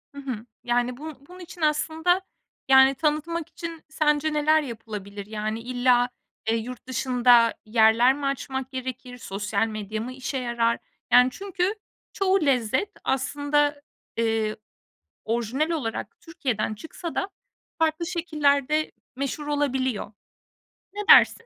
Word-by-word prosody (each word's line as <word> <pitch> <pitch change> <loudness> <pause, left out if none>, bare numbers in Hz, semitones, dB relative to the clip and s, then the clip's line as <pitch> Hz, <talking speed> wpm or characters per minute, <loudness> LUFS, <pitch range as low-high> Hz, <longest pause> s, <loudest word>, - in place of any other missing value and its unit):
Hı 280 - -7
hı. 245 -4 -5 0.2
Yani, 245 0 0
bun 310 0 -8
bunun 360 +1 -13
için 350 -1 -11
aslında, 320 +4 +2 0.5
yani, 265 0 +7
tanıtmak 310 +2 -1
için 335 -2 -7
sence 305 0 +1
neler 305 +1 +4
yapılabilir? 210 -5 -7
Yani, 215 +1 -3
illa, 245 0 +2 0.4
eee, 225 - +3
yurt 250 +3 -7
dışında 245 -2 +4
yerler 225 +3 +5
mi 285 0 -5
açmak 265 -1 -3
gerekir? 255 -1 -6
Sosyal 205 0 -1
medya 215 0 -4
mı 250 +3 -5
işe 265 +1 -4
yarar? 235 -2 0 0.3
Yani, 250 +1 +7
çünkü 390 +2 -2 0.4
çoğu 390 -1 +2
lezzet 260 - +1
aslında, 290 +2 +1 0.4
eee, 225 -2 +1 0.7
orijinal 240 +7 0
olarak 230 -7 -4
Türkiye'den 250 - -2
çıksa 320 - -7
da 390 - -1 0.5
farklı 320 +1 +1
şekillerde 305 -3 +1 0.2
meşhur 280 +2 -3
olabiliyor. 260 -7 -1 0.8
Ne 415 - -4
dersin? 465 - +7
265 Hz, 125 wpm, -25 LUFS, 230-310 Hz, 0.8 s, yani